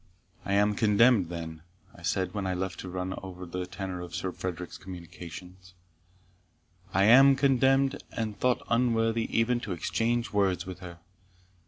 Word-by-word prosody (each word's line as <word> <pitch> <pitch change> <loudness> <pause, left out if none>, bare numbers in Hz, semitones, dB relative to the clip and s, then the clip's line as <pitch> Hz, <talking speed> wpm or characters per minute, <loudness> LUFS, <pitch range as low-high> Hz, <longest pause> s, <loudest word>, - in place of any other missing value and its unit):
"I 100 - -1
am 105 +1 +3
contemned, 105 -2 +4
then," 80 -2 -6 0.3
I - - -15
said, 95 -1 -1
when 100 -2 -3
left 95 -2 -3
to 90 - -6
run 90 +1 -3
over 90 -1 -8
the 90 +1 -5
tenor 95 -1 -5
of 90 -1 -7
Sir 95 - -2
Frederick's 90 -1 -6
communications 90 +1 -10 1.2
"I 95 - +3
am 135 +6 +8
contemned, 135 0 +3
and 110 -2 -3
thought 125 +2 0
unworthy 115 -1 +1
even 120 +2 +2
to 110 -6 -4
exchange 115 +7 -1
words 95 -3 +1
with 95 -1 -7
her. 85 -2 -9
95 Hz, 150 wpm, -28 LUFS, 90-115 Hz, 1.2 s, am